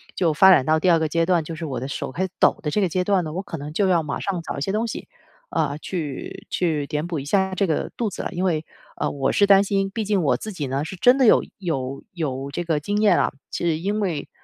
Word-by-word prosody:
就 170 -4 +2
发 190 +5 +7
展 135 -7 +5
到 155 0 +3
第 185 - +2
2 165 - +4
个 160 -1 0
阶 165 0 +1
段， 175 -2 +2
就 165 - -7
是 160 +1 -5
我 130 -5 -3
的 130 - -3
手 - - -4
开 185 - -1
始 190 - -6
抖 - - +4
的 150 - -1
这 210 - +1
个 190 - +3
阶 180 +3 0
段 190 -2 +2
呢， 155 - -5
我 185 +4 -3
可 165 - -6
能 145 +2 -7
就 195 +2 +2
要 170 -3 +3
马 145 - -4
上 185 -3 -2
找 - - -5
一 - - -4
些 195 - -1
东 220 +3 0
西， - - -6 0.4
呃， 145 -2 0
去 155 -8 -5
去 155 -5 0
填 150 +2 -2
补 165 -4 -3
一 135 - -7
下 190 +4 +1
这 195 0 +1
个 155 - -1
肚 230 -3 0
子 - - -6
了。 - - -4
因 180 +1 -2
为， 160 -3 0 0.3
呃， - - 0
我 140 -2 0
是 200 - +4
担 195 -1 +7
心 195 -1 0
毕 220 +1 -3
竟 200 -4 +1
我 140 - +2
自 215 - -6
己 145 -6 -4
呢 135 +3 -2
是 190 - -6
真 250 +8 +5
的 265 - +4
有 220 - +6 0.2
有 140 -7 -3
有 140 -5 -3
这 175 - -3
个 160 -3 +1
经 205 +7 -2
验 210 - +5
啊， - - +1 0.2
是 165 -2 -1
因 205 +4 -1
为， 165 -7 -2
170 Hz, 305 characters per minute, -23 LUFS, 150-195 Hz, 0.4 s, 发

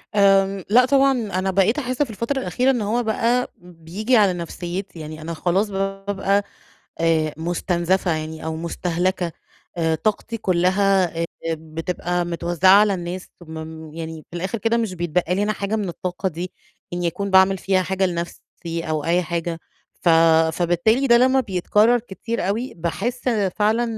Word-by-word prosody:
آمم 195 -1 +4
لأ 245 +4 +6
طبعًا 275 +1 +4
أنا 195 -7 -1
بقيت 195 +8 +2
أحس 255 -1 -3
في 250 - -6
الفترة 235 +6 -2
الأخيرة 255 +5 +1
إن 245 -4 -1
هو 230 +4 0
بقى 235 +3 +1
بييجي 180 +6 -2
على 200 -4 +4
نفسيّتي 175 +1 -6
يعني 155 0 -8
أنا 170 +2 -5
خلاص 185 +6 0
بابقى 195 0 -1 0.6
آآ 160 -2 +2
مستنزفة 175 +2 0
يعني 155 0 -6
أو 160 0 -2
مستهلكة، 175 +1 -1 0.5
آآ 160 -1 +1
طاقتي 215 +5 -2
كلها 185 -2 +2
آآ - - +1 0.3
بتبقى 165 +3 -3
متوزعة 175 +1 +1
على 210 -2 +3
الناس. 180 +1 -5
ثم 165 -2 -11
م 160 -1 -10
يعني 160 -1 -7
في 175 - -5
الآخر 190 +6 -3
كده 225 +2 +1
مش 225 -5 -1
بيتبقى 175 +1 0
لي 200 - +1
أنا 215 +1 0
حاجة 205 +1 -2
من 205 -4 -2
الطاقة 180 +2 -3
دي 175 +2 -6 0.4
إني 175 -1 -1
أكون 200 +4 -3
باعمل 190 0 +5
فيها 190 0 +1
حاجة 190 +1 0
لنَفسي 170 -1 -5
أو 155 -1 -1
أي 175 +2 +2
حاجة، 170 0 -3 0.4
ف 175 - +2 0.4
فبالتالي 180 +11 +2
ده 235 - +7
لما 260 +2 +4
بيتكرر 210 +3 +2
كتير 230 0 -4
أوي، 230 +6 -2
باحس 215 +10 -2 0.3
فعلًا 215 +3 +2
185 Hz, 160 wpm, -22 LUFS, 170-215 Hz, 0.6 s, ده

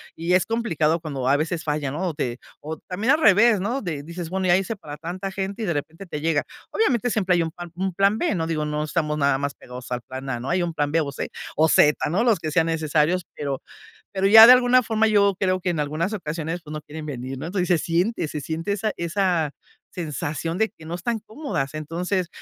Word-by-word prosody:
y 170 +2 -1
es 185 - +4
complicado 170 -9 0
cuando 140 -5 -4
a 140 - +4
veces 160 +2 -2
falla, 150 -2 -1
¿no?, 170 +7 -2
o - - -4
te 125 -4 -3 0.2
o 155 +2 -5
también 210 +9 +2
al 320 - +1
revés, 210 -2 +5
¿no?, 240 +7 -1
de 155 -7 -4
dices: 170 +1 -6
"Bueno, 185 +1 -1
ya 175 - +5
hice 195 +4 -2
para 150 -7 -9
tanta 185 +4 -5
gente", 195 +3 -4
y - - -1
de 170 - 0
repente 160 +6 -5
te 150 - -5
llega. 155 -1 +1 0.3
Obviamente, 245 - +1
siempre 190 -5 +2
hay 170 - +2
un 160 - -4
pan 175 +1 -9
un 190 +1 -2
plan 195 +4 +3
B. 335 - 0
No, 165 -1 -1
digo, 155 -2 -1
no 150 0 -2
estamos 150 -1 -1
nada 140 -2 +2
más 140 0 -2
pegados 125 0 -10
al 125 0 -2
plan 130 +2 -7
A, 120 -3 -2
¿no?, 130 - -5
hay 180 +1 +1
un 170 -1 -3
plan 145 -2 -1
B, 165 - +3
o 140 -2 -3
C, - - -4 0.3
o 160 +2 +3
Z, 150 0 +4
¿no? 195 +9 +1
Los 225 -7 +3
que 155 -1 -4
sean 165 +1 +3
necesarios, 160 +2 +1
pero 140 -2 -3 0.5
pero 195 0 +2
ya 220 +2 +11
de 245 - +10
alguna 255 0 +5
forma 220 0 +2
yo 200 -2 +4
creo 185 -1 +1
que 180 - 0
en 165 -3 -1
algunas 155 +7 -1
ocasiones, 165 -2 -4
pues 150 -1 -10
no 155 - -4
quieren 155 +1 -8
venir, 130 -2 -5
¿no?, 160 +5 -5
pues 180 -2 0
se 175 -3 +4
siente 170 +3 0
se 150 - -4
siente 165 +6 -3
esa 210 +1 -1
esa 170 -3 0 0.4
sensación 160 +1 -4
de 220 +1 +2
que 160 - -16
no 165 - -5
están 225 +6 -2
cómodas. 205 - -3
Entonces, 175 +4 -2
170 Hz, 245 wpm, -23 LUFS, 150-195 Hz, 0.5 s, ya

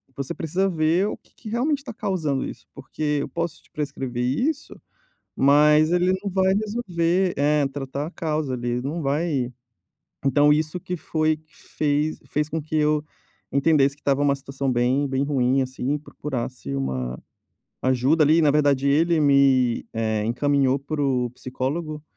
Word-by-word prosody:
"Você 140 -1 -4
precisa 180 +5 -1
ver 165 +3 +2
o - - -5
que - - -30
que 220 - -9
realmente 275 +5 0
tá 255 -4 -7
causando 185 - -1
isso - - -9
porque 150 -1 -3
eu - - -3
posso 170 +3 -4
te - - -26
prescrever 135 -5 -3
isso, 270 - -1 0.6
mas 150 +3 +5
ele 180 +1 +3
não 200 - -2
vai 190 0 +3
resolver 190 -5 0
é, 145 0 +2
tratar 135 +1 -5
a - - -9
causa 155 -6 -2
ali, 120 0 -2
não 150 +6 -3
vai". 140 -3 0 0.8
Então, 145 +2 +5
isso 155 +3 -1
que 180 +1 -4
foi 155 -1 0
que 155 0 -27
fez 150 +1 -1
fez 150 0 -1
com 160 +1 -2
que 155 - -8
eu 150 0 +2 0.5
entendesse 140 -1 +3
que - - -28
estava 140 0 +1
uma 140 -1 +3
situação 135 0 -3
bem, 125 +4 +2
bem 135 0 0
ruim 135 -2 +2
assim 130 +2 -2
e 150 - -1
procurasse 125 - -5
uma 65 -2 -3 0.6
ajuda 130 +5 +3
ali. 160 +3 +4
Na 150 - +5
verdade, 140 -2 +2
ele 160 +3 +3
me, 135 -4 +3
eh, 110 -2 -1
encaminhou 135 +3 +2
para 145 +2 -4
o 125 -3 +1
psicólogo, 145 +5 -4
145 Hz, 165 wpm, -24 LUFS, 135-160 Hz, 0.8 s, mas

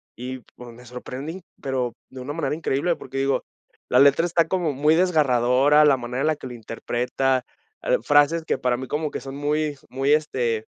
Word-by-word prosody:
y 130 +1 -6 0.2
pues, 120 -1 -11
me 125 +1 -15
sorprendí, 135 +8 -7 0.2
pero 130 -3 -2 0.2
de 130 -1 -9
una 140 +3 -5
manera 150 -2 -2
increíble, 165 +2 0
porque 135 +1 -8
digo, 135 0 +1 0.5
la 125 - +4
letra 140 +4 +5
está 165 -1 +2
como 175 -4 0
muy 150 +4 +3
desgarradora, 145 -4 +4
la 140 -2 +5
manera 125 +2 -4
en 155 - +1
la 155 - +2
que 145 - -9
la 125 - -8
interpreta, 125 +3 -1 0.4
l - - +2
frases 145 +3 +3
que - - -1
para 125 -1 0
mí 130 - -6
como 150 +2 -2
que - - -4
son 135 +1 -8
muy 150 0 -1
muy, 135 +3 +1
este, 120 -7 0
135 Hz, 195 wpm, -23 LUFS, 125-155 Hz, 0.5 s, letra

